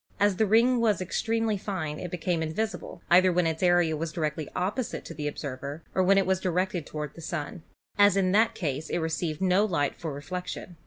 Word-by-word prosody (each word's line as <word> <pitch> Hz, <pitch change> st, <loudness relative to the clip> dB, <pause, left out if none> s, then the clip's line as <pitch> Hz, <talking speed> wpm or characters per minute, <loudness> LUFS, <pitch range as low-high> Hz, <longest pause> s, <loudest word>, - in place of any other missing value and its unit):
As 205 Hz, -2 st, +3 dB
the 220 Hz, -, +3 dB
ring 235 Hz, +4 st, +4 dB
was 220 Hz, -3 st, +2 dB
ex 185 Hz, -1 st, -2 dB
tremely 225 Hz, -2 st, 0 dB
fine 160 Hz, -7 st, -4 dB
it 180 Hz, -, -5 dB
became 175 Hz, 0 st, -1 dB
invisible, 170 Hz, +2 st, -4 dB
either 185 Hz, +1 st, +6 dB
when 175 Hz, 0 st, +2 dB
its 160 Hz, -1 st, -1 dB
area 175 Hz, -3 st, +3 dB
was 160 Hz, +1 st, -3 dB
directly 155 Hz, -1 st, -3 dB
opposite 205 Hz, +7 st, -2 dB
to -, -, -7 dB
the 150 Hz, 0 st, -4 dB
observer 145 Hz, +1 st, -5 dB
or 185 Hz, -, +2 dB
when 195 Hz, +2 st, +4 dB
it 195 Hz, -, +3 dB
was 190 Hz, 0 st, +1 dB
directed 180 Hz, -3 st, -1 dB
toward 150 Hz, -1 st, -5 dB
the 165 Hz, -, -11 dB
Sun, 160 Hz, 0 st, -5 dB, 0.4 s
as 205 Hz, -1 st, +6 dB
in 185 Hz, -2 st, +2 dB
that 220 Hz, +3 st, +3 dB
case 150 Hz, -3 st, -3 dB
it -, -, 0 dB
received 160 Hz, -1 st, -2 dB
no 185 Hz, +2 st, +4 dB
light 165 Hz, -9 st, 0 dB
for 160 Hz, -, -5 dB
reflection. 175 Hz, +4 st, -6 dB
180 Hz, 210 wpm, -27 LUFS, 155-195 Hz, 0.4 s, either